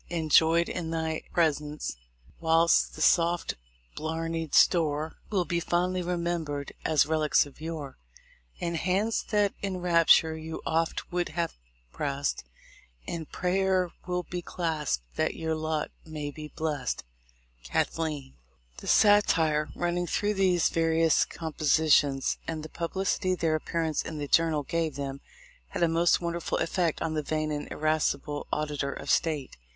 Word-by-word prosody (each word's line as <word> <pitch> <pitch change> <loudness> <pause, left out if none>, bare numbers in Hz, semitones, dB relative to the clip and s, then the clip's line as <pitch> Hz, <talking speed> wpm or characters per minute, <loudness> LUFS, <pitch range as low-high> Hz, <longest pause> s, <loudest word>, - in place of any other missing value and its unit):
243 170 -2 -2
Enjoyed 165 +2 +4
in 170 -3 -3
thy 160 -1 -2
presence; 150 - 0 0.4
whilst 165 0 +3
the 155 - -1
soft 170 0 +3 0.4
blarnied 165 0 -3
store 155 -2 +3
Will 190 -4 +1
be 170 +2 0
fondly 180 +2 0
remembered 170 -5 -2
as 155 -3 +3
relics 155 -1 +3
of 145 +1 -15
yore, 155 -4 -6 0.6
And 170 -1 -2
hands 195 +6 0
that 205 -2 +2
in 195 -2 -2
rapture 170 -2 +4
you 160 0 -6
oft 165 +2 -1
would 175 0 -1
have 170 +1 -2 0.4
pressed, 140 - -2 0.6
In 165 -3 -5
prayer 185 0 +1 0.2
will 180 0 -1
be 180 0 -5
clasped 160 - -2
that - - 0
your 160 -1 -2
lot 155 -1 -2
may 150 -2 -5
be 150 +1 -8
blest. 150 -6 -2 0.6
Cathleen. 145 - -2 0.4
The - - -9
satire 165 -8 +4
running 175 0 -1
through 205 +5 0
these 185 -4 +3
various 165 -1 +3
com 160 -2 -6
positions, 145 -3 +3
and 160 -2 -3
the 155 - -7
publicity 185 +2 -1
their 165 -3 0
appearance 160 0 -1
in 155 - -6
the 145 -1 -4
Journal 160 -1 +3
gave 165 +1 -1
them, 140 -1 -5 0.5
had 170 - -2
a - - +5
most 165 +1 +3
wonderful 170 -1 -2
effect 170 -2 0
on 160 -1 -1
the 155 - 0
vain 155 +1 -2
and 145 -1 -4
irascible 150 -1 -1
Auditor 150 -2 -1
of - - -4
State. 150 -5 0
160 Hz, 145 wpm, -28 LUFS, 155-175 Hz, 0.6 s, a